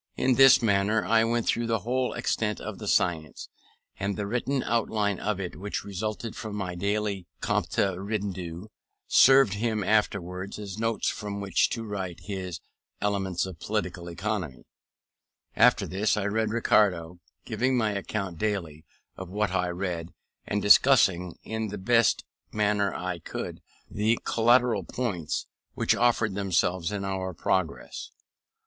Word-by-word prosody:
In 130 - +2
this 135 -1 +7
manner 105 +1 +2
I 115 0 +4
went 115 0 0
through 120 0 0
the 115 -3 0
whole 125 +4 -1
extent 105 -2 -1
of - - -7
the - - -6
science; 80 -4 0 0.5
and 100 0 -1
the 105 - -2
written 125 +5 -1
outline 105 -4 0
of 105 -2 -2
it 90 -3 -5
which 100 +2 -4
resulted 105 +2 -4
from 110 -2 -6
my 95 -3 -3
daily 100 0 -2
compte - - -1 0.2
rendu, 95 -2 -4 0.4
served 135 -5 +6
him 110 0 -1
afterwards 95 -2 0
as 100 -1 -7
notes 115 0 0
from 105 -2 -3
which 100 -2 +2
to 115 - -3
write 95 -5 -5
his 95 -4 -5 0.4
Elements 95 -3 -1
of 90 -4 -9
Political 90 -3 -3
Economy. 85 - -4 0.9
After - - +5
this 105 +3 0
I 100 - -1
read 110 +2 0
Ricardo, 90 -7 +2 0.3
giving 130 0 +1
an 105 -2 0
account 100 -3 -4
daily 85 -8 -2 0.3
of 95 -2 -8
what 105 0 -1
I 90 -1 0
read, 90 -2 -3 0.4
and 105 0 -1
discussing, 95 -7 +5
in 110 0 -3
the 105 0 -5
best 115 +2 +2 0.3
manner 105 -2 +1
I 90 -1 -4
could, - - -6 0.3
the 110 +3 +1
collateral 120 +1 +3
points 95 -11 -3 0.3
which - - +2
offered 115 -3 +2
themselves 95 -2 0
in 100 -1 -3
our 95 -2 -3
progress. 90 +3 -2
100 Hz, 145 wpm, -27 LUFS, 95-110 Hz, 0.9 s, this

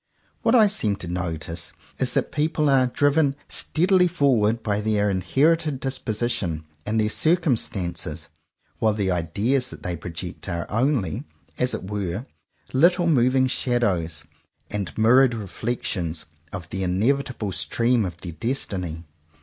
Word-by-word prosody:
What 230 - +3
I 225 -3 +7
seem 155 - +1
to 90 - -8
notice 85 -2 -4 0.3
is - - 0
that - - 0
people 150 -1 +1
are 130 -2 +4
driven 145 +2 +2
steadily 180 +2 +2
forward 120 -9 +2
by 105 -1 0
their 105 -1 +1
inherited 140 - +2
disposition 110 - -2 0.2
and 110 +1 +1
their 105 - +2
circumstances; 105 - 0 0.5
while 110 -1 +3
the 100 -3 0
*'ideas" 105 +10 0
that - - -11
they 90 - -2
project 85 +3 -7
are 85 -1 -2
only, 115 - 0 0.3
as 125 0 +2
it - - -6
were, 100 +2 -3 0.5
little 175 +6 +4
moving 130 -4 +4
shadows 95 - 0 0.5
and 100 -3 -3
mirrored 120 +3 +5
reflections 100 -6 -3 0.3
of 90 -4 -6
the 95 - -4
inevitable 110 +4 0
stream 115 +6 +1
of 90 -4 -4
their 85 - -6
destiny. 90 -5 -3
110 Hz, 135 wpm, -24 LUFS, 90-135 Hz, 0.5 s, I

